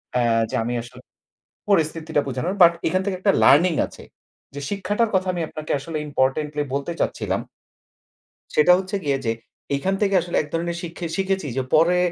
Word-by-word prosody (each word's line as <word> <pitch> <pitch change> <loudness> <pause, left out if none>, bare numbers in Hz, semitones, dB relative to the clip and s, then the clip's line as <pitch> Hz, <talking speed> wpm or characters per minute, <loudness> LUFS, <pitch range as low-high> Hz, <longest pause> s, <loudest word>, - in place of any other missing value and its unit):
অ্যা 125 - +3 0.3
যে - - -3
আমি 120 +1 -2
আসলে 120 - -13 0.7
পরিস্থিতিটা 160 -3 +1
বোঝানোর 135 +9 -2
বাট 170 0 +8 0.2
এখান 185 +2 +1
থেকে 195 -2 -1
একটা 200 0 +3
লার্নিং 170 +4 +6
আছে। - - -13 0.5
যে 145 - -5
শিক্ষাটার 205 +3 0
কথা 185 0 +1
আমি 175 -2 -2
আপনাকে 155 0 -5
আসলে 155 +2 -5
ইম্পোর্টেন্টলি 145 +2 0
বলতে 140 +5 -2
চাচ্ছিলাম - - -1 1.1
সেটা 165 +4 +6
হচ্ছে 190 +2 -3
গিয়ে 140 -1 +1
যে, 115 - +1 0.4
এখান 190 +7 -1
থেকে 200 -2 +2
আসলে 175 - -3
এক 150 - -4
ধরনের 170 +1 -2
শিক্ষে 170 0 -6
শিখেছি 190 -3 -1
যে 130 - +1
পরে 170 +3 +5
170 Hz, 170 wpm, -23 LUFS, 145-185 Hz, 1.1 s, বাট